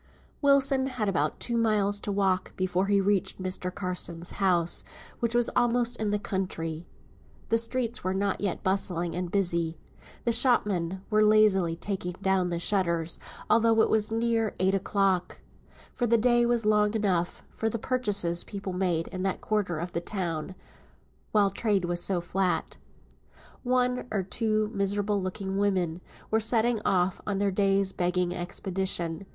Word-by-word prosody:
Wilson 275 -2 +3
had 250 -5 -2
about 155 -6 0
two 240 - -2
miles 210 -3 +1
to 205 - -4
walk 190 -2 0
before 185 +1 0
he 200 0 +3
reached 195 -1 0
Mr. 185 -1 -3
Carson's 180 -2 -2
house, 175 -3 +2 0.4
which 235 0 -1
was 240 -1 +2
almost 240 0 +2
in 215 -1 -1
the 210 - +1
country. 175 -5 -4 0.6
The 230 - +3
streets 235 0 -2
were 185 +1 -1
not 200 +1 -1
yet 200 -4 -2
bustling 180 -3 0
and 180 0 -3
busy. 170 -4 0 0.5
The 235 - +3
shopmen 200 -7 +1
were 215 0 +4
lazily 210 -5 +4
taking 180 0 -4
down 190 0 0
the 170 -1 -2
shutters, 170 -3 0 0.3
although 230 0 +4
it - - 0
was 215 0 +1
near 225 -1 0
eight 190 +1 +2
o'clock; 195 -2 0 0.5
for 245 - -1
the 230 +1 +4
day 240 +1 +3
was 235 -2 +1
long 210 0 +3
enough 185 -5 0
for 225 - 0
the 230 - -3
purchases 205 -8 +1
people 195 -2 -6
made 180 -3 0
in 185 -1 -5
that 190 0 -1
quarter 205 -6 -1
of 175 +3 -4
the 170 - -2
town, 175 -2 -4 0.8
while 205 -2 +3
trade 200 -2 0
was 175 0 -1
so 180 0 +1
flat. 180 +1 -1 0.8
One 250 0 0
or 200 -3 0
two 215 +2 -1
miserable 200 0 0
looking 190 +1 -3
women 185 -4 0 0.3
were 220 - +3
setting 225 0 +1
off 180 -1 +1
on 205 -2 -1
their 200 0 +1
day's 195 0 +2
begging 180 -1 0
expedition. 175 -1 -2
195 Hz, 155 wpm, -28 LUFS, 180-220 Hz, 0.8 s, were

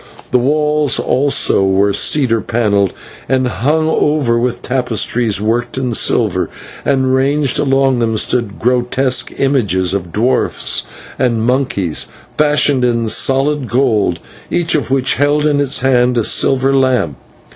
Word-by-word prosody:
The 125 - +3
walls 150 +1 +1
also 135 -6 +1
were 95 +1 +1
cedar 120 -5 +2
panelled, 100 -5 0 0.4
and 130 -1 +1
hung 155 +6 0
over 145 -6 +1
with 120 0 -3
tapestries 120 -4 -1
worked 120 +4 -2
in 125 -2 -2
silver, - - +1 0.3
and 130 -2 +1
ranged 140 +1 +1
along 135 -2 +1
them 115 -2 0
stood 115 -2 -1
grotesque 125 +2 0
images 105 -10 0
of 90 -4 -4
dwarfs 115 +8 0 0.3
and 120 -3 0
monkeys, 120 - -1 0.3
fashioned 145 -3 +2
in 115 -2 0
solid 135 +3 +1
gold, 110 -9 0 0.3
each 175 -1 0
of 145 -6 -1
which 130 -1 0
held 145 +1 +2
in 145 -1 +1
its 140 -1 0
hand 125 -1 +2
a 115 - +1
silver 135 +4 +2
lamp. 130 - +1
125 Hz, 135 wpm, -14 LUFS, 115-135 Hz, 0.4 s, The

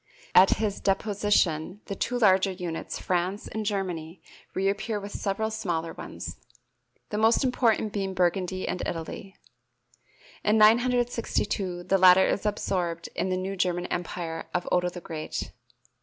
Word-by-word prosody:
At 190 +1 +7
his 210 -2 -2
deposition 195 -3 +1
the 200 - -4
two 245 +5 -2
larger 195 -4 +4
units, 175 -3 -5
France 185 +3 -1
and 220 - -4
Germany, 180 -4 -3 0.4
reappear 200 +3 0
with 200 0 -8
several 220 +3 -2
smaller 170 -7 -2
ones, 85 0 -7 0.7
the 210 - -1
most 225 +5 +4
important 230 -4 +1
being 195 -2 -2
Burgundy 185 +1 0
and 180 - -2
Italy. 175 +3 -6 1.1
In 210 +1 +3
962 230 -5 +2
the 195 +2 +2
latter 185 0 +7
is 205 - 0
absorbed 175 -5 -2
in - - -1
the 185 - 0
new 190 +1 -3
German 180 -1 0
empire 170 -1 -4
of 180 - -1
Otto 180 0 +2
the 175 0 -9
Great. 160 -2 -5
190 Hz, 140 wpm, -27 LUFS, 175-210 Hz, 1.1 s, At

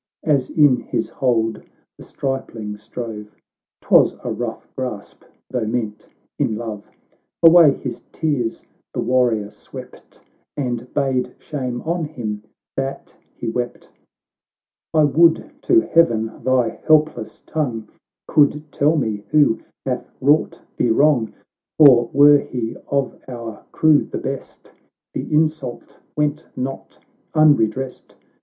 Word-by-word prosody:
As 140 -5 +1
in 145 -5 +4
his 115 - -3
hold 115 -4 0 0.3
the - - -13
stripling 115 -6 -4
strove, 105 0 -8 0.2
— - - -71
('Twas - - +4
a - - -3
rough - - -5
grasp, - - -6 0.3
though 120 -4 -1
meant 110 -2 -3 0.3
in 110 - +1
love,) 110 -2 -6 0.5
Away 165 -3 +8
his - - -6
tears 140 -8 -2 0.3
the - - -2
warrior 120 -4 +1
swept, - - -13 0.4
And 125 -3 -3
bade 135 -3 0
shame 125 -5 -5
on 165 0 -1
him 110 -8 -5 0.3
that 135 0 -4 0.2
he - - -6
wept. 120 +1 -4 1.0
"I 155 -2 +4
would 160 +3 +3
to 345 -2 +4
heaven, 115 - +1
thy 125 -2 +1
helpless 155 -7 +2
tongue 120 -9 -3 0.4
Could 150 0 +2
tell 150 +3 +2
me 110 -7 -1
who 145 -7 +4 0.3
hath - - -3
wrought 145 +3 +2
thee 120 - +2
wrong! 125 -1 +3 0.5
For, 125 -6 +7
were 145 +1 +7
he 120 -4 -4
of 140 -1 -1
our 115 -4 -7
crew 155 -2 +4
the - - -5
best, 135 0 -7 0.4
The - - -5
insult 155 -5 -1 0.2
went 150 +1 -1
not 135 +1 -5 0.4
unredressed. 135 -4 +2
130 Hz, 120 wpm, -20 LUFS, 115-150 Hz, 1.0 s, Away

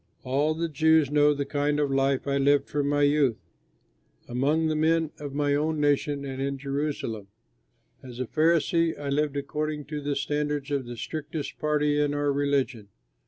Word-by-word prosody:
All 145 +4 +1
the 165 +1 -1
Jews 160 -1 +3
know 150 0 +5
the 145 -1 -1
kind 145 +1 0
of 145 -2 +1
life 135 0 +1
I 140 0 +1
lived 140 0 +3
from 145 -1 -1
my 145 0 +2
youth, 145 -5 +3 0.9
among 140 +6 +1
the 155 -1 0
men 160 0 +2
of 145 -2 -6
my 145 -1 +1
own 155 +2 0
nation 145 -1 +1
and 135 -1 -5
in 140 0 -2
Jerusalem. 140 -7 -3 0.7
As 125 -2 -10
a 130 - -1
Pharisee 165 +3 +2
I 145 -1 -4
lived 145 0 0
according 150 +1 -3
to 150 - -3
the 145 0 -2
standards 145 0 -2
of 135 -3 -1
the 120 0 -7
strictest 155 +3 -5
party 150 -1 +1
in 145 0 0
our 145 -1 +1
religion. 140 -6 0
145 Hz, 175 wpm, -26 LUFS, 140-150 Hz, 0.9 s, know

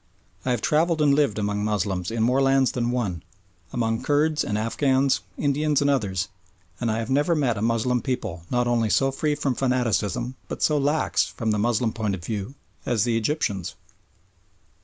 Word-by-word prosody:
I - - -2
have 120 -3 0
travelled 160 +2 +2
and 145 -2 +4
lived 140 -8 +2
among 105 0 -1
Moslems 100 -4 -1
in 115 -1 -1
more 125 +4 +3
lands 135 -1 +3
than 120 -1 -1
one, 105 -9 -2 0.5
among 115 -1 -1
Kurds 150 +1 +2
and 105 - -2
Afghans, 130 +4 +2 0.2
Indians 145 0 +1
and 145 -1 +2
others, 100 -7 0 0.5
and 120 - -1
I 110 - 0
have 115 +3 -3
never 150 +5 +2
met 135 -7 +1
a 100 - -4
Moslem 115 +2 +1
people 125 -11 -3
not 125 0 +1
only 120 -2 +1
so 135 +8 +2
free 150 +2 0
from 145 -3 -1
fanaticism 125 -2 0
but - - -4
so 150 - +3
lax, 145 +3 +1
from 115 -3 -2
the 105 - 0
Moslem 115 +1 +1
point 105 -4 -1
of 85 -2 -10
view, 105 +4 -4 0.3
as 115 -5 +1
the 120 -2 +1
Egyptians. 110 - -1
120 Hz, 180 wpm, -24 LUFS, 110-140 Hz, 0.5 s, and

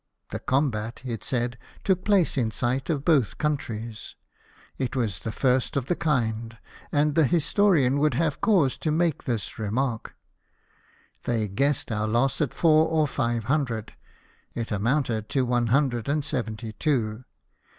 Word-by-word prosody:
" - - -53
The - - -3
combat," 120 -5 -1
it 115 -4 -4
said, 120 -1 -1
" - - -24
took 185 -2 +1
place 200 -5 +3
in 120 -5 +1
sight 125 +4 -1
of 145 -4 -1
both 145 - +3
countries; 115 -7 -3 0.6
it 130 -2 -2
was 110 -10 -1
the 110 - -4
first 130 +2 +1
of 135 - -1
the 175 - 0
kind, 115 -7 -1 0.3
and 150 0 +2
the 155 -2 +4
historian 165 -4 +3
would 150 +1 +2
have 160 -3 0
cause 170 - +3
to 155 - -1
make 160 0 0
this 115 -4 -3
remark." 115 +2 -2 1.1
They 115 -3 0
guessed 135 +7 0
our 105 0 -1
loss 120 +7 +1
at 145 - +1
four 160 -1 +4
or 160 -2 +2
live 120 -3 0
hundred; 125 -4 -1 0.6
it 115 -1 -4
amounted 115 +1 0
to 130 -2 +1
one 120 -1 +1
hundred 120 -1 +1
and 145 0 0
seventy 115 -5 -4
two. 115 -3 -1
130 Hz, 160 wpm, -26 LUFS, 115-150 Hz, 1.1 s, the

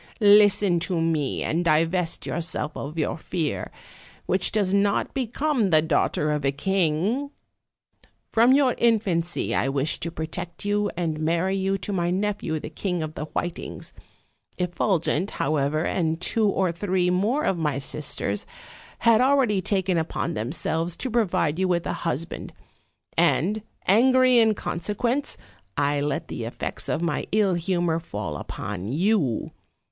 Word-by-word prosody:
Listen 205 -3 +6
to 170 0 -1
me, 160 -4 0
and 165 +3 0
divest 165 +2 +1
yourself 160 -3 -2
of 150 +4 -6
your 160 +1 -1
fear, 160 -2 -3 0.6
which 185 0 +1
does 200 -3 +1
not 200 0 +1
become 260 -2 0
the 155 -2 +4
daughter 150 -1 +1
of 150 -1 -1
a 135 - +2
king. 190 - 0 1.0
From 235 +3 +5
your 270 -2 +4
infancy 195 -8 +1
I 135 - +1
wished 140 +3 -1
to 170 - -2
protect 170 +4 -6
you 205 0 +1
and 160 -3 -1
marry 170 +4 +1
you 195 0 0
to 195 +2 -5
my 175 -2 0
nephew, 190 -4 -1
the 150 - -8
King 180 0 -2
of 155 0 -5
the 150 - -5
Whitings; 175 +2 -5 0.6
Effulgent, 180 0 0
how 155 +2 -1
ever, 150 +4 0
and 160 -2 0
two 215 +4 +1
or 190 -3 +1
three 180 0 0
more 215 +11 +1
of 185 - 0
my 150 -4 0
sisters, 135 -7 -2 0.5
had 230 0 +4
already 255 -7 +3
taken 190 -2 0
upon 165 +1 -2
themselves 160 +6 -1
to 260 - -4
provide 180 -8 +1
you 190 - +2
with 175 -2 0
a - - -1
husband; 165 0 -4 0.6
and, 210 +6 +2 0.3
angry 255 +4 +5
in 220 -2 +4
consequence, 235 +11 -2 0.4
I 145 0 +1
let 145 0 -2
the 115 - -5
effects 115 - -4
of 160 - -1
my 170 -4 -1
ill 205 -3 +3
humor 175 -1 0
fall 105 - -5
upon 100 +6 -5
you. 165 - +1
175 Hz, 150 wpm, -25 LUFS, 155-205 Hz, 1.0 s, Listen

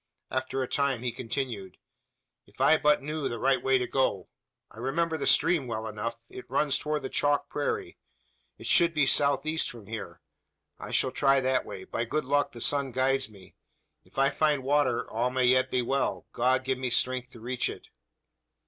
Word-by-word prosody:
After 130 0 -2
a - - -4
time 135 -4 0
he 125 - -1
continued: 115 -6 -4 0.7
"If - - -23
I 135 +4 +6
but 150 -2 +3
knew 150 0 -3
the 120 - -4
right 130 +2 +2
way 135 0 +3
to 125 - -1
go. 125 -9 -1 0.4
I - - -13
remember 160 +6 -1
the 155 - -2
stream 160 -7 +3
well 110 -1 -4
enough. 110 +2 -4
It 125 - -11
runs 140 +2 +2
towards 150 -1 -2
the 130 - -4
chalk 145 0 +1
prairie. 145 - -3 0.6
It - - -11
should 170 -1 +4
be 150 -2 +3
south 140 +1 +3
east, 160 +1 +2
from 115 -4 -11
here. 110 +1 -7 0.6
I - - -7
shall 130 - +1
try 135 0 +3
that 130 0 +1
way. - - -8
By 115 - -3
good 150 +4 -2
luck 145 +2 +1
the 120 - -8
sun 140 0 +2
guides 135 0 +1
me. 100 -3 -16 0.5
If - - -24
I 135 +1 +3
find 150 -2 +1
water 135 -3 +1
all 120 +3 -1
may 130 0 +1
yet 130 +1 +4
be 125 -1 0
well. 135 +3 -1
God 130 +2 +2
give 130 -1 -1
me 130 -1 -2
strength 125 +1 0
to 115 - -12
reach 125 +2 -2
it!" - - -10
130 Hz, 195 wpm, -28 LUFS, 125-140 Hz, 0.7 s, I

